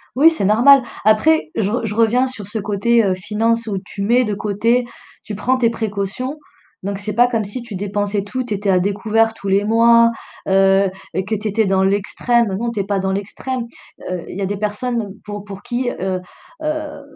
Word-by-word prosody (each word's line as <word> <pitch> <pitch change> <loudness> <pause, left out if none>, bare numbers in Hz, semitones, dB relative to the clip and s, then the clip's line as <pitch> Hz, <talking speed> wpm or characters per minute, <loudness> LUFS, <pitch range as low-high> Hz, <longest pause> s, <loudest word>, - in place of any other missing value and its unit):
Oui, 295 +5 +7
c'est 320 -11 -2
normal. 245 +7 +6 0.2
Après, 160 -8 +3
je 205 -3 0
re 235 0 -1
je 210 - -3
reviens 230 +3 +3
sur 240 -7 -7
ce 215 +2 -5
côté, 215 +3 +2
heu, 195 -2 +2
finances 225 +5 -1
où 200 -3 -2
tu 200 - -7
mets 240 +5 +3
de 210 -3 -2
côté, 220 +4 +1 0.4
tu 210 - -6
prends 255 +6 +1
tes 240 -2 +3
précautions, 225 +5 -3 0.4
donc 200 0 -3
c'est 210 +1 -4
pas 240 +3 +5
comme 230 -3 -1
si 205 +5 -6
tu 235 -4 -8
dépensais 205 +1 -2
tout, 255 +5 -4
tu 240 - -3
étais 205 0 -2
à 185 -1 +4
découvert 215 +4 +1
tous 200 -3 -6
les 200 +1 +2
mois, 230 +1 +5 0.4
heu, 195 0 +4 0.4
que 220 - 0
tu 215 +1 -4
étais 220 +2 +1
dans 190 0 +2
l'extrême. 210 +4 +1
Non, 235 +2 -2
tu 225 - -4
es - - +1
pas 200 -1 0
dans 190 0 -1
l'extrême, 230 +6 -4 0.4
heu, 180 -2 -3
il - - -7
y - - -4
a - - 0
des 200 +2 -2
personnes 210 0 -3
pour 205 -1 -6
pour 200 -1 -9
qui, 245 0 -2
heu 185 0 -3 0.4
heu, 305 -1 -3
210 Hz, 210 wpm, -19 LUFS, 200-235 Hz, 0.4 s, Oui